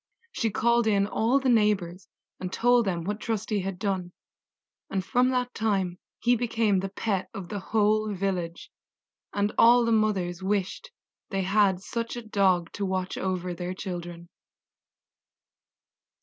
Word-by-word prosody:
She 230 - -1
called 235 +2 +2
in 200 -2 +3
all 225 +5 +1
the 270 - -2
neighbors, 205 -6 +1 0.3
and 185 -1 -5
told 245 +2 +3
them 175 -4 -1
what 205 +4 -3
Trusty 215 -1 -2
had 190 -1 -4
done, 190 -2 -2 0.8
and 190 -1 -2
from 250 +1 +3
that 250 -1 -1
time 195 -5 -1 0.2
he 245 +1 +3
became 225 -4 +1
the 195 +1 -3
pet 190 -2 -2
of 190 -4 -7
the 205 - -3
whole 215 +1 +1
village, 185 -3 -3 0.6
and 205 +1 0
all 240 +1 +7
the 230 - +1
mothers 195 -5 +1
wished 195 - -2 0.4
they 195 -2 -1
had 195 -1 +2
such 230 +3 -4
a 240 - -6
dog 185 -5 +2
to 205 - -5
watch 185 -1 -2
over 185 -1 -2
their 180 +1 -5
children. 175 -2 -6
200 Hz, 150 wpm, -27 LUFS, 185-225 Hz, 0.8 s, all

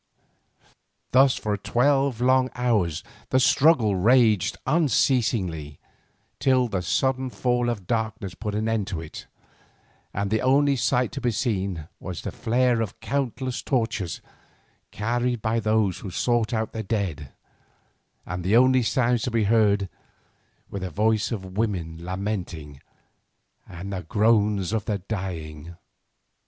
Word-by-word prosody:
Thus 130 +1 +5
for 105 -1 -1
twelve 125 +4 +1
long 130 +1 +3
hours 105 -10 0 0.3
the 130 - +3
struggle 130 -6 +4
raged 110 0 +3
unceasingly, 110 - +1 0.6
till 130 -2 +3
the 100 -5 -2
sudden 130 +9 0
fall 125 -1 0
of 105 -6 -4
darkness 110 -4 -2
put 105 +1 -4
an 110 +1 -1
end 110 -3 0
to 90 -6 -3
it, 80 -1 -9 0.8
and 100 0 -2
the 110 - +1
only 140 +2 +3
sight 125 +1 +1
to 140 - -6
be 120 - +1
seen 100 - -2
was 90 -2 -6
the - - -4
flare 120 0 +1
of 110 -3 -4
countless 130 -1 -2
torches 115 - -1 0.7
carried 120 +3 -1
by 110 +2 0
those 110 -4 +1
who 100 - -7
sought 120 +4 0
out 110 -2 -1
the 110 - -3
dead, 95 - -3 0.9
and 90 0 -5
the 100 +6 +4
only 130 +1 +5
sounds 120 0 +1
to - - -1
be 115 -2 +1
heard 100 -2 +3 0.8
were 100 - -4
the 95 0 -4
voice 110 +6 +1
of 95 -4 -5
women 85 -7 -2
lamenting, 90 -7 -5 0.9
and 90 +3 -7
the 95 - -3
groans 105 +1 +2
of 110 -1 -1
the 105 - -1
dying. 85 -5 -6
110 Hz, 135 wpm, -25 LUFS, 95-125 Hz, 0.9 s, Thus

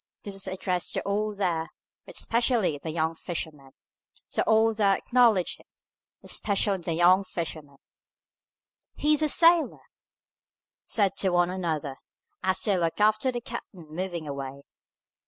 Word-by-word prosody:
This 200 - -7
was 195 0 -4
addressed 185 -1 -2
to - - 0
all 210 +2 -1
there, 170 -5 -1 0.4
but - - -11
especially 230 - +1
the 160 - -6
young 160 0 0
fisherman; 155 -5 -6 0.5
so - - -1
all 225 0 +4
there 200 -2 +3
acknowledged 235 -7 +2
it, - - -20 0.6
but - - -5
especially 200 -1 +1
the 170 -1 -3
young 180 +4 +5
fisherman. 155 -6 -6 1.2
"He's 300 0 +3
a 305 - +3
sailor!" 335 +2 +4 1.0
said 200 -4 +1
one 175 -1 +3
to - - -4
another, 155 -7 -3 0.4
as 190 0 0
they 205 -3 +1
looked 165 +2 -1
after 215 +4 +3
the 240 -1 -4
captain 190 -8 -9
moving 170 -1 -4
away. 140 -1 -6
185 Hz, 140 wpm, -27 LUFS, 165-215 Hz, 1.2 s, young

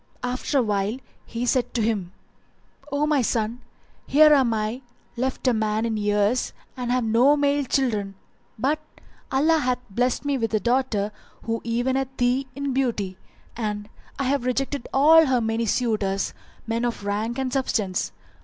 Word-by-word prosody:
After 250 +3 -1
a - - +5
while 205 +1 0 0.3
he 235 +1 -3
said 250 0 0
to 235 - +1
him, 205 -5 -1 0.8
"O 285 +1 +1
my 300 -3 +2
son, 230 +1 -1 0.5
here 305 +2 +7
am 265 -5 +4
I 220 +3 -2 0.3
left 260 +2 -2
a 250 - +5
man 215 0 0
in 225 -1 -1
years 210 +3 +1 0.2
and 250 -2 -3
have 250 0 +2
no 240 +6 +4
male 285 0 +2
children, 215 -8 0 0.4
but 280 +7 +1 0.5
Allah 315 +4 +3
hath 250 -3 +1
blessed 245 +6 0
me 280 -2 0
with 225 -1 0
a - - +3
daughter 235 -4 0 0.3
who 230 0 -2
eventh 260 +3 -1
thee 250 +2 +1
in 280 -1 -2
beauty; 215 -8 -1 0.4
and 210 -2 -3 0.3
I 275 - -1
have 270 -1 +1
rejected 265 +1 -1
all 315 +3 +6
her 255 -2 +3
many 225 0 -1
suitors, 205 -4 0 0.3
men 230 +1 -1
of 235 -4 -2
rank 215 +4 -1
and 260 -2 -2
substance. 195 - 0
245 Hz, 160 wpm, -24 LUFS, 215-265 Hz, 0.8 s, here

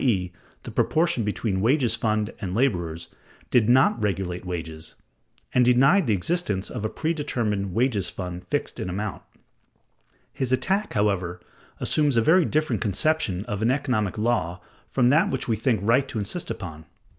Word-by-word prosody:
e., 95 -9 +1 0.3
the - - -7
proportion 160 -6 +1
between 105 -2 -1
wages 125 0 +3
fund 110 -2 -1
and 95 -2 -3
laborers) 85 -10 0 0.4
did 115 -2 +4
not 125 -2 +4
regulate 95 -3 -2
wages, 80 -3 -6 0.6
and 125 - +5
denied 135 +8 +4
the 110 - +3
existence 100 - -1
of 120 -5 -5
a 110 - 0
predetermined 115 - -2
wages 110 -1 0
fund 90 -1 -6
fixed - - -3
in 90 - -3
amount. 100 +2 -4 1.1
His 130 -2 -2
attack, 190 +11 0
however, 95 -4 0 0.4
assumes 145 -5 +1
a - - +5
very 170 +6 +5
different 150 -8 0
conception 105 - 0
of 105 0 -4
an 115 - +2
economic 120 -8 0
law 105 -6 0 0.3
from 125 -2 +2
that 160 +9 +4
which - - -2
we 115 - +1
think 110 0 +1
right 130 +6 +3
to 125 - -5
insist 110 - -3
upon. 80 -4 -6
110 Hz, 155 wpm, -25 LUFS, 95-130 Hz, 1.1 s, and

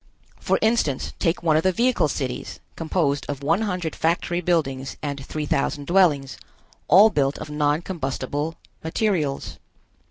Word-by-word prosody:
For - - +1
instance, 220 - +1
take 170 +1 0
one 160 -2 +3
of - - +3
the 185 - +2
vehicle 240 -3 +2
cities, 130 -4 -4 0.2
composed 155 -3 0
of 140 -1 -4
one 165 +8 +2
hundred 180 -7 -2
factory 175 +1 0
buildings 135 -7 -1
and 140 -2 -4
three 150 +2 -4
thousand 145 0 -1
dwellings, 155 -6 +2 0.5
all 200 +7 +7
built 140 -3 +1
of 150 - -7
non 150 +2 +1
combustible 145 -1 -3 0.3
materials. 160 -5 -1
155 Hz, 140 wpm, -23 LUFS, 140-175 Hz, 0.5 s, all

